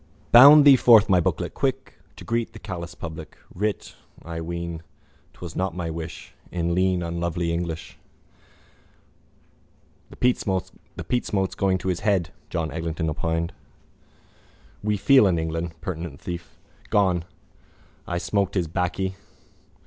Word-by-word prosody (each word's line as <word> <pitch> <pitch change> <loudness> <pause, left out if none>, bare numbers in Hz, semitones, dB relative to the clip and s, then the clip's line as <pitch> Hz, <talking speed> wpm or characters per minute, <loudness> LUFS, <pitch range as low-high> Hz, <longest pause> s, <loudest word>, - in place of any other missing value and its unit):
Bound 140 +5 +10
thee 140 -2 +9
forth, 115 -4 +6
my 90 -2 +5
booklet, 85 - -1
quick - - -3 0.2
To - - -11
greet 115 0 -2
the - - -10
callous 90 -5 -7
public. 80 -1 -8 0.2
Writ, 105 +3 -3 0.3
I 85 0 -6
ween, 85 0 -5 0.5
'twas - - -9
not 95 -2 -2
my 85 -2 -3
wish 80 0 -8 0.2
In 85 -1 -1
lean 90 0 +1
unlovely 85 0 -2
English. 85 -1 -5 2.1
—The - - -13
peatsmoke 100 -2 -1
is - - -11
going 95 -1 +1
to 95 - -4
his 90 - -1
head, 95 -6 0 0.2
John 80 -3 -2
Eglinton 80 0 -3
opined. 80 +2 -2 1.3
We 105 0 0
feel 105 +3 +5
in 90 -3 +1
England. 80 +1 -3
Penitent 80 -5 -5
thief. 85 -1 -7 0.3
Gone. 95 -4 +2 0.8
I 85 - -2
smoked 100 +2 -1
his 90 -4 0
baccy. 95 +2 -2
90 Hz, 130 wpm, -24 LUFS, 85-100 Hz, 2.1 s, Bound